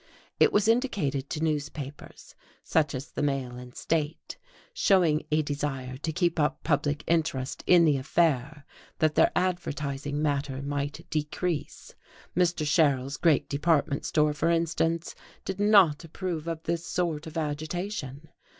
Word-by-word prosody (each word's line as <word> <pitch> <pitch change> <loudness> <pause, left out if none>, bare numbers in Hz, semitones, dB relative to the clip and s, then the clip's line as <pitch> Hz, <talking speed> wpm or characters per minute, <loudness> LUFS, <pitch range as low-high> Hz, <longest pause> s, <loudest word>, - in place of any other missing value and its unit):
It - - +6
was 205 0 +2
indicated 200 - 0
to 155 - -3
newspapers 150 -2 -4 0.3
(such 150 -4 +1
as 130 +2 -6
the - - -4
Mail 135 -4 -1
and 125 0 -11
State) 155 0 -2 0.4
showing 175 - +3
a 155 0 +2
desire 140 -3 -3
to 160 +4 -3
keep 170 0 0
up 150 0 0
public 145 -1 0
interest 155 -6 -1
in 175 -2 +7
the 150 -3 +3
affair 145 0 0 0.3
that 155 -1 +2
their - - +4
advertising 145 -6 -2
matter 140 -2 -1
might 145 +3 -3
decrease; 155 +2 -3 0.4
Mr. 175 -3 +1
Sherrill's 140 -3 +2
great 160 -5 +3
department 145 -1 +1
store, 150 -1 +2
for 160 +3 0
instance, 165 0 0 0.3
did 190 0 -4
not 200 -7 +5
approve 165 -1 -4
of 165 -1 -4
this 170 0 -2
sort 165 -3 -2
of 160 +1 -7
agitation. 155 -1 -4
155 Hz, 140 wpm, -27 LUFS, 145-170 Hz, 0.4 s, in